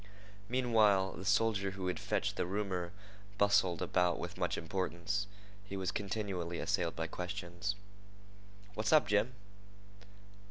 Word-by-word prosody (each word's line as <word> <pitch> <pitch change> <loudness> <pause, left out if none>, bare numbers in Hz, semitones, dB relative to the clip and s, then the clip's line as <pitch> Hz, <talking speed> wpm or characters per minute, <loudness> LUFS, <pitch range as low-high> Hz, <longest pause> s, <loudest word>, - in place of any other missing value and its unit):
Meanwhile, 110 -6 +4
the 95 - -8
soldier 100 0 +3
who 95 - -3
had 90 - -1
fetched - - -1
the - - -1
rumor 95 -3 -2 0.5
bustled 100 -4 +3
about 90 -2 +2
with - - -5
much - - -1
importance. 95 +3 -2 0.4
He 100 -1 -6
was 95 -1 -1
continually 95 -4 -2
assailed 85 -2 0
by 80 - -2
questions. 90 +2 -3 1.0
"What's 110 0 0
up, 155 -7 +7
Jim?" 105 +4 +2
95 Hz, 125 wpm, -34 LUFS, 90-105 Hz, 1.0 s, up